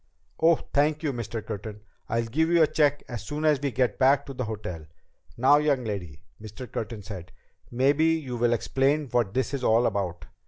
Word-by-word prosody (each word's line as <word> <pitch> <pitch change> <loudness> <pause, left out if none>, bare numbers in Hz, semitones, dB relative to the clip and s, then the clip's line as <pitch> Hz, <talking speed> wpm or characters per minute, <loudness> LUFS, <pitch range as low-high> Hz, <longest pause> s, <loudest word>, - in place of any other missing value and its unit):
"Oh, 165 +1 +5 0.2
thank 150 +2 +2
you, 145 -3 0
Mr. 115 -2 -5
Curtin. 105 0 -6 0.3
I'll 115 +1 0
give 160 +8 0
you 170 -1 +5
a - - +7
check 145 -1 +1
as 120 -3 -6
soon 150 +1 -4
as 150 -3 +3
we 140 - 0
get 125 -4 0
back 135 +1 +4
to 135 - -7
the 130 -1 -3
hotel." 90 -8 -6 0.5
"Now, 135 +5 +5
young 145 -4 +1
lady," 95 -8 -6 0.2
Mr. 110 +4 -8
Curtin 110 -2 -5
said, 95 -4 -8 0.4
"maybe 140 +6 +2
you 160 -6 0
will 120 0 +2
explain 135 +5 0
what 115 -4 0
this 130 +1 0
is 135 -2 -3
all 115 +1 +4
about." 90 -6 -2
125 Hz, 195 wpm, -26 LUFS, 110-145 Hz, 0.5 s, a